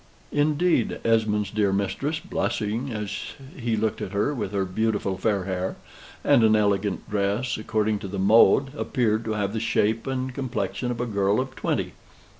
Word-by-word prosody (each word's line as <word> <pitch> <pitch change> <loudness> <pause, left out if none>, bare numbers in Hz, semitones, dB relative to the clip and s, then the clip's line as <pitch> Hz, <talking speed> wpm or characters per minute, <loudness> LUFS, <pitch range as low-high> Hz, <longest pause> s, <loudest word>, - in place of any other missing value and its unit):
Indeed, 150 -1 +2
Esmond's 110 -2 +2
dear 105 -2 +1
mistress, 120 +11 -1
blushing 115 -2 -2
as 105 -3 -4 0.2
he 120 -3 -1
looked 110 0 -1
at 95 - -5
her, 105 +9 +1
with 115 -8 -3
her 100 -2 0
beautiful 100 0 -1
fair 100 -1 0
hair, 95 0 -2 0.5
and 115 - +5
an 110 -1 +5
elegant 100 -2 0
dress 105 +5 0
according 110 -1 0
to 100 - -6
the 100 +1 -5
mode, 115 +7 +5
appeared 115 -6 0
to 110 - -1
have 100 -1 -1
the 110 - -1
shape 115 0 +1
and 130 -1 -2
complexion 125 -1 -3
of 120 -1 -2
a - - 0
girl 100 -1 +1
of 130 0 -3
twenty. - - -2
110 Hz, 170 wpm, -25 LUFS, 100-125 Hz, 0.5 s, and